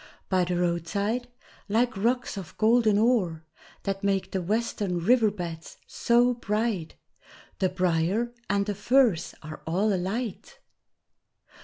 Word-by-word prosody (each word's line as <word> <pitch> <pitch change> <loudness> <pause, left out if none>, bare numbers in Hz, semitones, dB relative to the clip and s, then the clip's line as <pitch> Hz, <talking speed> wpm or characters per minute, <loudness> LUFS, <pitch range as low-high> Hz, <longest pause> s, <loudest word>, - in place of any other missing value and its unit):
By 185 -2 +2
the 180 0 -1
roadside, 200 +7 -1 0.4
like 235 +4 +2
rocks 240 +6 0
of 190 -5 -8
golden 220 -1 +4
ore 205 -8 +2 0.4
That 195 0 -3
make 195 -1 0
the 190 - -1
western 205 -1 -1
river 220 +5 +4
beds 170 -5 -7
so 240 +1 +2
bright, 210 -6 -2 0.6
The 185 - +2
briar 185 +6 0 0.2
and 200 0 +1
the 205 - -2
furze 215 -3 +2
are 155 0 -8
all 195 +6 +1
alight! 195 +5 -3
200 Hz, 125 wpm, -27 LUFS, 180-230 Hz, 0.6 s, golden